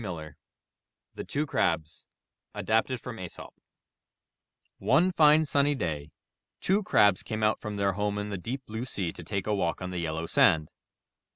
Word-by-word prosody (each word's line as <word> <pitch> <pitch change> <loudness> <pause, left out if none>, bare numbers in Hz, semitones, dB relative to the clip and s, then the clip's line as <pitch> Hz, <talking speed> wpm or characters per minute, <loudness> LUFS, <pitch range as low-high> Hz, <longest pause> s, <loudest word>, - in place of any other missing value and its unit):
»g^^ 110 - -5
^ 80 -4 -6 0.8
THE - - -6
TWO 145 +2 -2
CRABS 80 - -1 0.5
Adapted 115 +3 +1
from 115 -1 -8
Aesop 90 -2 -8 1.3
One 140 - +3
fine, 155 -2 +5
sunny 145 0 +2
day 75 - -3 0.5
two 195 +3 +2
Crabs 100 - +4
came 110 0 -4
out 105 0 +2
from 105 -1 -5
their 100 -1 +2
home 105 +1 -1
in 105 0 -3
the 100 - -2
deep 130 +8 -5
blue 110 +3 -5
sea 95 -9 -3
to 85 - -9
take 100 +3 -3
a 105 - 0
walk 90 -4 0
on 90 0 -5
the 90 - -3
yellow 80 0 -2
sand. 80 -1 +3
105 Hz, 170 wpm, -28 LUFS, 85-130 Hz, 1.3 s, fine